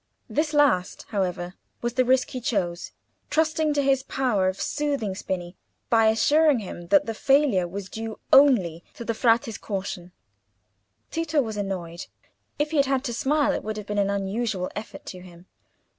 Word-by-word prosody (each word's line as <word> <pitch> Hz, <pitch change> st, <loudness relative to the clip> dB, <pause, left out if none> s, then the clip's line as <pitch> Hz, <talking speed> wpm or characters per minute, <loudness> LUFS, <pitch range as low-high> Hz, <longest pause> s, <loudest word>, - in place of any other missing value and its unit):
This 305 Hz, 0 st, 0 dB
last, 285 Hz, -, +2 dB
however, 180 Hz, -4 st, -2 dB, 0.3 s
was 240 Hz, 0 st, -1 dB
the 255 Hz, -, +3 dB
risk 255 Hz, +1 st, +2 dB
he 255 Hz, -, -5 dB
chose, 185 Hz, -9 st, -2 dB, 0.4 s
trusting 315 Hz, -1 st, +1 dB
to 285 Hz, -, +2 dB
his 270 Hz, -1 st, +3 dB
power 245 Hz, -8 st, 0 dB
of 190 Hz, +1 st, -2 dB
soothing 280 Hz, -9 st, -1 dB
Spini 185 Hz, -2 st, -5 dB, 0.4 s
by 225 Hz, -1 st, +5 dB
assuring 290 Hz, +7 st, +4 dB
him 180 Hz, -5 st, -7 dB
that 195 Hz, +2 st, +4 dB
the 225 Hz, -, -3 dB
failure 270 Hz, -7 st, +3 dB
was 190 Hz, +2 st, -6 dB
due 220 Hz, +2 st, -6 dB, 0.2 s
only 200 Hz, -, +5 dB
to 235 Hz, -, -8 dB
the 230 Hz, -, -1 dB
Frate's 225 Hz, -1 st, +1 dB
caution. 190 Hz, -3 st, -5 dB, 1.0 s
Tito 325 Hz, -2 st, 0 dB
was 220 Hz, -5 st, -1 dB
annoyed. 185 Hz, -4 st, -4 dB, 0.5 s
If 295 Hz, +1 st, -1 dB
he 320 Hz, -, 0 dB
had 275 Hz, -1 st, +4 dB
had 270 Hz, -1 st, +1 dB
to 240 Hz, -4 st, -3 dB
smile 290 Hz, +5 st, +1 dB
it -, -, -3 dB
would 215 Hz, 0 st, -4 dB
have 210 Hz, -, -6 dB
been 205 Hz, 0 st, -2 dB
an 200 Hz, 0 st, +2 dB
unusual 200 Hz, -1 st, -2 dB
effort 210 Hz, +1 st, -8 dB
to 185 Hz, -, -8 dB
him. 180 Hz, -1 st, -14 dB
220 Hz, 175 wpm, -25 LUFS, 190-270 Hz, 1.0 s, by